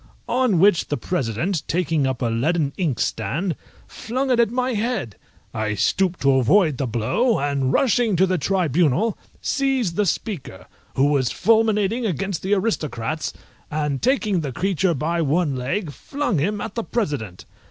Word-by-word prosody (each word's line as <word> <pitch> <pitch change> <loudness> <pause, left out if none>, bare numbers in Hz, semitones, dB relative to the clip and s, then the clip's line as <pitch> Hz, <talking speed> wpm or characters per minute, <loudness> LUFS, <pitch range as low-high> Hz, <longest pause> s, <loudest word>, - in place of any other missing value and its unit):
On 245 -6 +2
which 180 0 +4
the 145 - -1
President, 160 - -1
taking 165 -4 +1
up 130 -1 -2
a - - +2
leaden 140 +6 0
inkstand, 155 - -1 0.3
flung 260 +4 -3
it 245 - +3
at 235 -3 +4
my 250 +2 -1
head. 215 - -2 0.4
I 105 -1 -1
stooped 185 - +1
to 135 -1 +4
avoid 155 - +3
the 135 - 0
blow, 120 - +1
and 140 -2 0
rushing 235 - +2
to 185 +3 +4
the 185 -2 0
tribunal 175 - +1 0.3
seized 265 -10 0
the 210 -1 +2
Speaker, 185 - -4 0.3
who 135 - +3
was 140 -4 +2
fulminating 220 +1 +2
against 190 +1 -2
the 195 +2 +1
Aristocrats, 155 - -2 0.4
and 150 -3 -2
taking 225 -7 +1
the 140 -3 -4
creature 185 +3 0
by 165 +5 -1
one 155 -1 +1
leg, 140 +7 -2
flung 275 - -2
him 205 +8 0
at - - -5
the 230 - -3
President. 145 - -3
175 Hz, 155 wpm, -22 LUFS, 140-210 Hz, 0.4 s, which